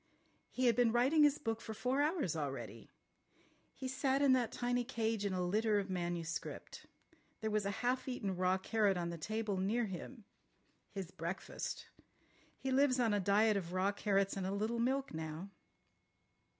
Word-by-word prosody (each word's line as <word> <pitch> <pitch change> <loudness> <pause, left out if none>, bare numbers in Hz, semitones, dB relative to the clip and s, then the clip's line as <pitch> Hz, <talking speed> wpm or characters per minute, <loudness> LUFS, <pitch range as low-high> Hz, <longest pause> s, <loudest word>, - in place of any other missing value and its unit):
He 255 - -1
had 235 -2 +5
been 240 -1 +4
writing 260 +7 +4
his 295 -1 +5
book 225 -3 -3
for 220 -1 -6
four 255 +5 +1
hours 295 - +1
already. 140 -3 -5 0.9
He 260 - -5
sat 265 +1 +1
in 270 -2 +6
that 245 -3 +2
tiny 245 0 0
cage 225 -4 -1
in 200 - 0
a 180 -1 0
litter 215 +3 +2
of 195 -1 -2
manuscript. 175 -2 -4 0.5
There 220 0 -1
was 210 -1 +1
a 200 +4 -4
half 255 +1 +1
eaten 205 -7 -2
raw 185 +1 +2
carrot 205 0 +1
on 170 -1 -2
the 170 - -6
table 215 +2 -2
near 215 +6 +1
him. 205 +4 -7 0.6
His 190 -3 -6
breakfast. 170 +3 -5 0.7
He 265 - -3
lives 260 -1 +4
on 230 -3 +3
a 205 - +2
diet 205 +3 +4
of 180 -2 -4
raw 185 +2 +2
carrots 200 -1 +1
and 190 -1 -2
a - - -1
little 215 +4 -1
milk 265 +3 0
now." 160 +4 -5
215 Hz, 175 wpm, -36 LUFS, 190-245 Hz, 0.9 s, in